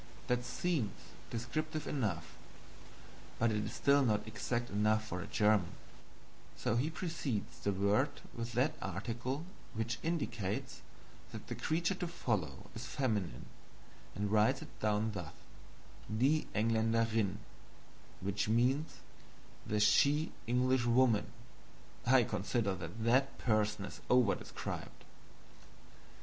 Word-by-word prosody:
That 125 0 +1
seems 135 - -1 0.4
descriptive 155 +6 -3
enough, 95 - -2 1.0
but 115 - +3 0.2
still 140 0 +3
it - - +3
is 130 - +3
not 105 -1 +1
exact 120 +3 -2
enough 105 +2 +2
for 90 -4 -4
a 100 - -6
German; 105 -4 +3 0.8
so 105 - 0
he 130 +6 +1
precedes 160 - -3
the 100 - 0
word 100 +8 +2 0.3
with 115 0 -4
that 130 +7 +2
article 120 - -3 0.3
which 115 0 -2
indicates 120 - -2 0.5
that - - -7
the - - -4
creature 165 +3 0
to 180 -1 -3
follow 105 - -2
is 115 +2 -6
feminine, 105 - -1 0.7
and 100 0 -1
writes 110 +5 +3
it - - -14
down 105 +1 +1
thus: 90 -7 -6 0.8
"die 135 +8 +2
Engländerinn," 115 -1 +2 0.9
which 100 +2 -1
means 125 +7 +1 0.7
"the 105 - +1
she 145 +9 +4 0.2
Englishwoman." 125 -2 +3 0.8
I 130 0 +7
consider 105 0 0
that 90 +5 -6
that 130 +4 +3
person 105 -3 +1
is - - -9
over 125 -5 +5
described. - - -6
115 Hz, 115 wpm, -35 LUFS, 105-130 Hz, 1.0 s, I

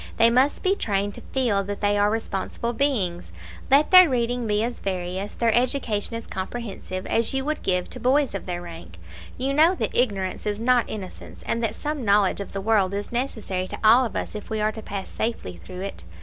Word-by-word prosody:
They 230 0 +5
must 260 +4 +2
be 380 0 +3
trained 205 - -1
to - - -10
feel 230 -7 +1
that 205 +1 -4
they 205 0 +2
are 205 0 +3
responsible 225 +2 -3
beings: 215 -11 0 0.4
let 280 +3 +4
their 365 -3 +9
reading 245 -1 0
be 210 0 +1
as 240 +1 -3
various, 185 +1 -4
their 230 -2 +2
education 240 -4 0
as 230 - -5
comprehensive, 190 -2 -5
as 230 0 +1
you 270 0 -1
would 305 +1 -2
give 180 -1 0
to - - -7
boys 270 +4 +2
of 195 - -5
their 175 -1 -4
rank. 165 - -10 0.4
You 270 +2 -1
know 320 +6 +5
that - - -3
ignorance 200 -6 0
is 205 0 -1
not 245 0 +2
innocence, 195 -4 -8
and 230 - -1
that 225 -1 -1
some 300 -3 -4
knowledge 200 -2 +3
of 200 - -7
the 195 - -4
world 200 -2 +2
is 205 0 -4
necessary 220 -7 -2
to - - -7
all 230 +4 +7
of 235 - -4
us - - -3
if 210 -1 -8
we 220 -1 -2
are 215 0 +1
to 220 - -8
pass 200 -2 -5
safely 220 - -4
through 180 - -8
it. 195 - -6
220 Hz, 215 wpm, -24 LUFS, 195-245 Hz, 0.4 s, their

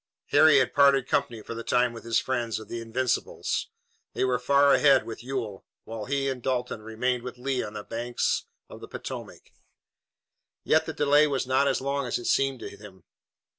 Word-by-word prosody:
Harry 155 0 +6
had 130 -2 +2
parted 140 -2 +4
company 115 -4 -1
for - - -7
the 115 0 -6
time 125 0 +2
with 115 - -10
his 115 -1 0
friends 120 -4 -1
of 110 - -9
the 120 - -5
Invincibles. 120 +2 -2 0.5
They - - -1
were 125 -2 +1
far 140 +2 +4
ahead 140 -2 +5
with 115 +1 -8
Ewell, 120 -7 -4 0.2
while 110 -1 -6
he 140 +1 -1
and 130 -2 -3
Dalton 125 -3 -2
remained 120 +3 -2
with 125 0 -8
Lee 130 +1 -1
on 105 - -6
the 105 -1 -6
banks 120 +3 -2 0.2
of - - -12
the - - -9
Potomac. - - -8 1.1
Yet - - +2
the - - -3
delay 145 +1 +4
was 135 -3 -1
not 130 +2 +2
as 135 -2 0
long 140 0 -2
as - - -1
it 120 - -8
seemed 135 -2 +1
to - - -8
him. 100 -3 -14
125 Hz, 195 wpm, -27 LUFS, 115-135 Hz, 1.1 s, Harry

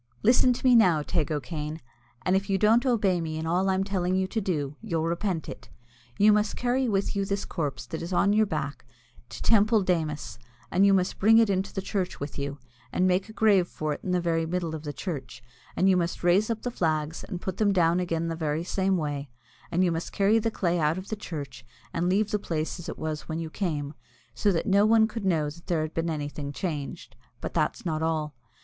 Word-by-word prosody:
Listen 250 +2 +5
to 245 - -7
me 250 -1 +7
now, 180 -9 +5
Teig 160 -2 -1
O'Kane, 150 +2 -4 0.5
and 185 - +3
if 195 +1 0
you 195 - +2
don't 225 +6 +4
obey 200 -8 +2
me 160 -1 -3
in 160 - -3
all 180 +4 +1
I'm 190 0 +2
telling 185 -2 0
you 190 0 +1
to 220 - -1
do, 150 -7 -2
you'll 170 -8 -2
repent 170 0 -1
it. - - -9 0.5
You 210 +1 +6
must 210 0 +1
carry 250 +1 0
with 200 0 0
you 200 - +1
this 200 +1 -2
corpse 145 -8 -3
that 120 - -6
is 170 +2 -5
on 200 +3 +3
your 215 0 +3
back 145 -4 -4 0.5
to - - -8
Teampoll 215 -2 +4
Démus, 155 -8 -1 0.3
and 195 +2 +4
you 200 - +5
must 185 -1 0
bring 220 +3 +6
it 225 -3 +5
into 190 +1 -1
the 195 - -4
church 190 -3 -2
with 140 0 -5
you, 140 0 -3 0.3
and 185 - +1
make 185 +2 +1
a - - -7
grave 210 -5 +3
for 155 -3 -3
it - - -7
in - - -4
the 180 0 +2
very 165 -1 0
middle 170 -1 -2
of 155 - -5
the 145 - -3
church, 135 -8 -6 0.3
and 190 - +3
you 190 - +5
must 175 -1 -1
raise 185 +5 +3
up 225 -1 -2
the 245 - -2
flags 155 -5 -1
and 180 - -6
put 185 0 -4
them 210 -2 +3
down 175 -2 +3
again 165 -2 -1
the 165 - -2
very 155 0 -1
same 190 +1 0
way, 145 -3 -3 0.4
and 175 +2 +2
you 180 - +2
must 165 +1 -3
carry 205 +3 +3
the 225 +1 0
clay 175 -5 0
out 155 +2 +1
of 185 +1 -7
the 220 - -2
church 140 - -7 0.3
and 170 +1 0
leave 205 +3 +1
the 210 - +1
place 160 -2 -3
as 175 0 -7
it - - -6
was 155 0 -4
when 160 - -2
you 165 -1 -5
came, 150 -7 -2 0.4
so 205 - +2
that 165 - -1
no 200 +1 +4
one 220 0 +5
could 225 -2 -5
know 160 -5 +2
that 165 +4 -10
there 165 -3 +1
had 155 - -5
been 165 +1 -1
anything 145 -2 -4
changed. 150 -2 -5 0.2
But - - -5
that's - - -1
not 155 -2 -1
all. 155 -2 -1
180 Hz, 235 wpm, -27 LUFS, 155-200 Hz, 0.5 s, me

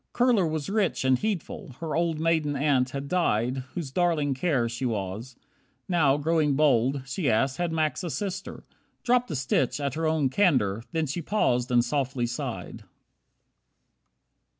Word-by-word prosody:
Kurler 240 -9 +3
was 155 -2 -3
rich 200 -9 0
And 130 -1 +3
heedful. 190 - -4
Her 160 -2 -3
old 165 -2 0
maiden 160 -3 +1
aunt 135 -3 +2
had 140 +2 -5
died 130 -8 +1 0.2
Whose 160 -7 -4
darling 160 -3 +1
care 130 -3 0
she 120 +3 -5
was. 110 +1 -3 0.5
Now, 155 -6 +3
growing 150 -1 +1
bold, 135 -2 +2
She 135 +2 -1
asked, 130 +4 +1
had 175 -1 -1
Max 155 +1 -1
a 175 - -3
sister? 190 +2 -5 0.4
Dropped 250 0 +2
a 155 - -3
stitch 130 0 0
At 140 -2 -2
her 160 +1 -1
own 155 -4 +1
candour. 130 - +2
Then 160 -2 0
she 145 +5 -3
paused 125 - +1
and 120 -1 +3
softly 135 -2 -1
sighed. 120 0 -5
145 Hz, 155 wpm, -26 LUFS, 130-170 Hz, 0.5 s, Kurler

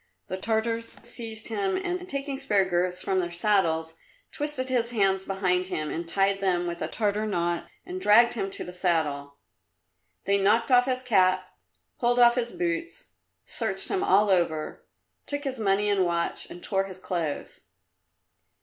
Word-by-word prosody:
The 185 - -3
Tartars 225 +2 -2
seized 225 -2 -7
him, 200 -4 0
and 360 - -3
taking 275 -1 -3
spare 205 -8 +2
girths 180 0 0
from 190 -1 +1
their 175 -1 -1
saddles 170 -3 0 0.3
twisted 290 -3 -3
his 245 -3 +1
hands 195 -4 +1
behind 185 -2 0
him 155 -4 -3
and 170 +1 -4
tied 195 +3 +1
them 180 -3 +1
with 170 0 -4
a - - -1
Tartar 210 0 -1
knot 175 -3 -1 0.2
and 370 0 -6
dragged 235 - +6
him 195 -4 -2
to - - -5
the 180 - -8
saddle. 150 -6 -1 0.9
They 200 +1 +3
knocked 230 +6 +3
off 250 0 +6
his 255 -1 -1
cap, 185 -5 +3 0.5
pulled 240 0 +2
off 240 -1 +7
his 240 -1 -1
boots, 335 -1 -4 0.3
searched - - -1
him 390 -1 0
all 210 - +4
over, 165 -4 -1 0.4
took 285 0 -3
his 265 -3 -3
money 205 0 +2
and 200 -2 +3
watch 170 -1 -2
and 175 - -10
tore 195 -2 +1
his 190 -1 -8
clothes. 170 -5 -4
195 Hz, 165 wpm, -27 LUFS, 180-240 Hz, 0.9 s, off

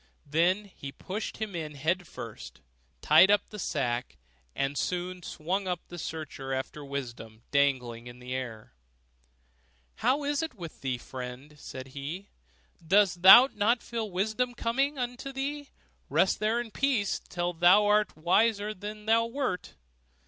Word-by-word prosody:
Then 175 +7 +2
he 140 -8 -9
pushed 195 +10 -5
him 215 -4 -4
in 155 -3 -5
head 170 +5 -1
first, - - -9 0.4
tied 190 - +7
up 205 0 +3
the 210 - -7
sack, 125 -8 -2 0.4
and 135 +1 -1
soon 180 +4 -2
swung 185 +5 -3
up 180 -2 -1
the 175 - -8
searcher 145 -5 -5
after 135 +3 -5
wisdom 120 -5 -7
dangling 125 -5 +1
in 120 0 -10
the 125 0 -7
air. 120 - -6 1.2
'How 285 +3 +1
is 290 +1 0
it 320 -6 -4
with 170 -6 -9
thee, 130 -2 -1
friend?' 125 +3 -8
said 130 -1 -8
he, 150 +9 -6 0.5
'dost 185 +1 +3
thou 240 +8 +10
not 225 +4 +2
feel 230 -2 -3
that 195 - -13
wisdom 220 +6 0
comes 270 +5 0
unto 245 +2 -4
thee? 280 +2 -4 0.4
Rest - - +2
there 220 +2 +1
in 240 -2 -5
peace, 245 -6 0
till 175 0 -2
thou 175 +5 +6
art 210 0 +3
a - - -18
wiser 205 +4 +3
man 215 - -7
than 210 +1 -7
thou 230 +1 +3
wert. 235 -7 -3
185 Hz, 155 wpm, -29 LUFS, 140-220 Hz, 1.2 s, thou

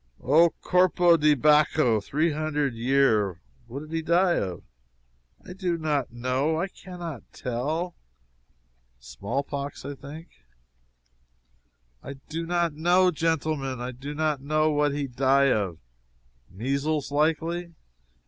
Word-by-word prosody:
"Oh, 160 +6 +5
corpo 180 -1 +4
di 150 -2 +4
Baccho! 150 -5 +3
three 155 - 0
hundred 150 -3 -1
year!" 115 -6 +2 0.3
"What 130 +4 -6
did 155 +1 -11
he 165 0 -1
die 175 +2 +3
of?" 90 -3 -4 0.8
"I - - -8
do 180 -2 -2
not 150 -6 -1
know! 130 +6 -1
I 185 +3 -1
can 180 0 -11
not 165 -8 -6
tell." 150 +9 -3 1.1
"Small 75 - -4
pox, 140 0 -6 0.2
think?" 150 +4 -10 1.7
"I 140 - -7
do 160 +5 -6
not 170 -2 0
know, 175 +4 +3
genteelmen! 155 -5 -1
I 125 +1 -4
do 140 +4 -7
not 155 -3 0
know 155 +2 +1
what 145 0 +2
he 145 0 -2
die 135 +1 +3
of!" 95 -6 -2 0.7
"Measles, 140 - -2
likely?" 165 +3 0
150 Hz, 125 wpm, -26 LUFS, 135-165 Hz, 1.7 s, Oh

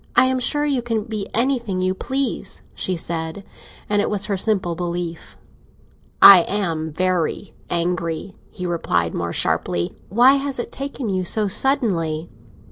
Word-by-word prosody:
"I - - +6
am 260 0 +1
sure 295 +4 +1
you 275 -4 0
can 230 -3 -2
be 215 -3 -4
anything 235 -5 0
you 185 0 +1
please," 265 +7 -3
she 185 -2 -2
said. 165 +3 -4 0.4
And 205 0 +2
it - - -1
was 205 -1 0
her 200 - -1
simple 190 -3 0
belief. 175 -1 -5 0.9
"I 195 -2 +12
am 165 -6 -2
very 180 0 -1 0.2
angry," 170 +1 -2 0.2
he 180 - -7
replied, 85 - 0
more 85 0 -3
sharply. 85 0 -1
"Why 250 +7 +5
has 275 -1 -3
it 240 - -4
taken 275 -3 -5
you 185 -1 0
so 210 +4 0
suddenly?" 180 - 0
190 Hz, 150 wpm, -21 LUFS, 170-240 Hz, 0.9 s, I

